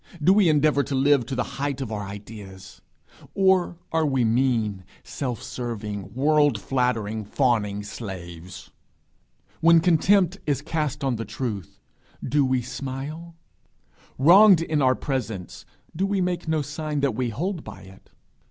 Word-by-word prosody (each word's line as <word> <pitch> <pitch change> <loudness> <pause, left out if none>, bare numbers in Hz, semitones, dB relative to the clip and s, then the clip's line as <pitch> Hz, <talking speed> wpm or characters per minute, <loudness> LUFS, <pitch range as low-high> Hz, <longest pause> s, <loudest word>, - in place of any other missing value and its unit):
Do 170 +5 +5
we 200 -4 +4
endeavour 150 -1 +3
to 140 - -3
live 135 -2 +3
to 135 - -3
the 125 - 0 0.2
height 140 -1 -2
of 130 -5 -5
our 105 -1 -3
ideas? 100 -1 -10 0.5
Or 190 -3 +2
are 160 0 +1
we 135 -5 +1
mean, 110 -5 +1 0.2
self 125 -6 -5
serving, 105 -4 -6
world 145 -3 +3
flattering, 110 -4 -1
fawning 105 -3 0
slaves? 90 -5 -9 0.9
When 165 0 +6
contempt 180 +3 +3
is 145 -1 0
cast 150 -2 -2
on 130 -4 0
the 115 - -3
truth, 105 - -5 0.5
do 145 +3 +2
we 130 -2 +1
smile? 135 +6 -6 0.8
Wronged 185 +5 +7
in 155 -3 0
our 130 -1 +4
presence, 115 -11 -5 0.3
do 190 +4 0
we 200 -1 0
make 180 -2 -2
no 160 -2 0
sign 150 +1 -4
that 140 -4 +1
we 125 +1 -1
hold 170 - -3
by - - -10
it? 95 0 -16
135 Hz, 145 wpm, -24 LUFS, 110-155 Hz, 0.9 s, Wronged